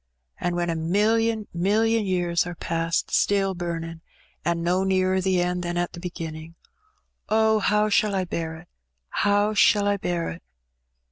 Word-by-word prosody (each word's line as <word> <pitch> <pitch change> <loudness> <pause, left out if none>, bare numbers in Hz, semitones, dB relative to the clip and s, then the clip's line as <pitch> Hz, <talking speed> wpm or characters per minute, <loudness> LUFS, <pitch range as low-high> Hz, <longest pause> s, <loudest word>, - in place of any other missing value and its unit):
And 175 0 -1
when 175 -1 0
a - - -2
million 215 +6 +1
milUon 215 +4 +2
years 175 -2 0
are 175 - -6
past, 165 0 -1
stiU 195 -1 +1
bumin', 165 -1 -5 0.4
and 170 -1 -1
no 180 +2 +1
nearer 190 0 +1
the 185 -1 +2
end 180 0 -1
than 175 0 -3
at 175 0 -1
the - - -8
beginnin'. 165 -2 -7 0.7
Oh, 220 0 +3
how 210 +1 +2
shall 210 -1 +2
I 190 -1 0
bear 165 -2 -4
it 165 +2 -13 0.3
— 65 +1 -12
^how 205 +1 +2
shall 205 0 +4
I 205 0 +2
bear 175 -3 -2
it? 85 - -9
180 Hz, 165 wpm, -24 LUFS, 170-205 Hz, 0.7 s, shall